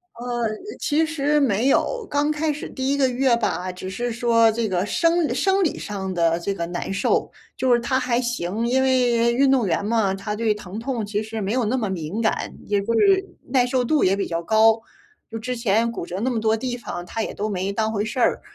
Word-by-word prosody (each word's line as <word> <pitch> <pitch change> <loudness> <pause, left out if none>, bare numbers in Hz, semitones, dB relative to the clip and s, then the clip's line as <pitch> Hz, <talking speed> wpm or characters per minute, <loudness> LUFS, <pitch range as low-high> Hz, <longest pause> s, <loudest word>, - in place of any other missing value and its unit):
呃， 240 +1 -8 0.5
其 315 +2 +1
实 300 -1 +1
没 235 0 +2
有， 460 - +1
刚 290 +1 +1
开 305 0 0
始 295 - -7
第 265 0 -3
1 280 - +2
个 265 -2 +3
月 250 -1 +2
吧， 185 -5 -2
只 185 +1 -6
是 240 +5 -3
说 230 -1 +4
这 230 -1 -1
个 185 +1 0
生 335 +5 +1
生 390 0 +2
理 330 - 0
上 190 -2 -4
的 170 -1 +2
这 200 +3 -2
个 170 -3 -3
难 175 +2 -4
受， 200 - +1 0.3
就 255 -2 +3
是 240 - +4
他 260 +2 0
还 250 -2 0
行， 230 -2 -2
因 260 +2 +2
为 240 -3 +3
运 270 +2 +3
动 245 -7 +2
员 180 +4 0
嘛， 215 -3 +1
他 205 +2 -4
对 220 0 +1
疼 205 0 -8
痛 235 -3 -3
其 210 +1 -2
实 220 0 -5
没 195 +2 -2
有 245 -2 +1
那 230 - 0
么 215 -5 -1
敏 185 +4 -3
感， 220 - -1
也 205 -1 +1
就 230 +2 0
是 385 -1 +4 0.2
耐 250 -2 +3
受 255 -1 +1
度 295 0 +2
也 190 +1 +3
比 200 - -2
较 170 0 -3
高。 220 +4 +4 0.5
就 225 - -5
之 250 +3 -4
前 230 0 +1
骨 170 - -5
折 180 +1 -6
那 255 - +1
么 235 -3 -1
多 220 0 +2
地 245 +2 -3
方， 175 -6 -6
他 225 - -4
也 - - -3
都 215 +1 -3
没 190 0 -2
当 220 +1 0
回 210 0 -1
事 240 +4 -6
儿。 - - +2
230 Hz, 250 characters per minute, -23 LUFS, 205-260 Hz, 0.5 s, 说